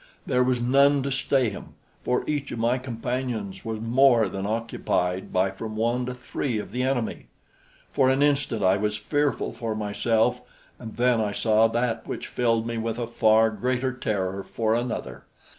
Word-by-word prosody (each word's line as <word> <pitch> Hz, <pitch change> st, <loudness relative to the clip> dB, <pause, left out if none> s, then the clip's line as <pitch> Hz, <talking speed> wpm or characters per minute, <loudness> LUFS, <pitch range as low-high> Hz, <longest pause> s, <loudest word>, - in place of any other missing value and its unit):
There 125 Hz, -2 st, +2 dB
was 125 Hz, -1 st, +1 dB
none 140 Hz, +3 st, +4 dB
to 140 Hz, -, -2 dB
stay 130 Hz, -3 st, +1 dB
him, -, -, -10 dB, 0.3 s
for 125 Hz, -, 0 dB
each 145 Hz, -2 st, -2 dB
of -, -, -4 dB
my 120 Hz, +3 st, +1 dB
companions 120 Hz, -4 st, -4 dB
was 110 Hz, -1 st, -4 dB
more 120 Hz, 0 st, +4 dB
than 95 Hz, +1 st, -4 dB
occupied 105 Hz, -5 st, -1 dB
by 95 Hz, +1 st, +2 dB
from 110 Hz, +3 st, -7 dB
one 120 Hz, +3 st, 0 dB
to 125 Hz, -, -4 dB
three 125 Hz, -1 st, -3 dB
of 105 Hz, -, -5 dB
the 125 Hz, +3 st, -2 dB
enemy. 130 Hz, -3 st, -2 dB, 0.6 s
For 135 Hz, -2 st, +3 dB
an 135 Hz, +2 st, +3 dB
instant 140 Hz, -7 st, +1 dB
I 95 Hz, +1 st, +4 dB
was 105 Hz, +1 st, -1 dB
fearful 145 Hz, +7 st, -1 dB
for 115 Hz, -2 st, -4 dB
myself, 110 Hz, +3 st, +1 dB, 0.4 s
and 115 Hz, -3 st, -8 dB
then 120 Hz, -1 st, +3 dB
I 105 Hz, -1 st, -1 dB
saw 110 Hz, +1 st, +3 dB
that 115 Hz, 0 st, -1 dB
which -, -, -5 dB
filled 115 Hz, -2 st, 0 dB
me 115 Hz, 0 st, -3 dB
with 115 Hz, 0 st, -2 dB
a 120 Hz, -, -2 dB
far 110 Hz, -1 st, +3 dB
greater 125 Hz, +4 st, -1 dB
terror 100 Hz, -5 st, -2 dB
for 110 Hz, +3 st, -1 dB
another. 120 Hz, 0 st, -3 dB
115 Hz, 175 wpm, -25 LUFS, 110-125 Hz, 0.6 s, none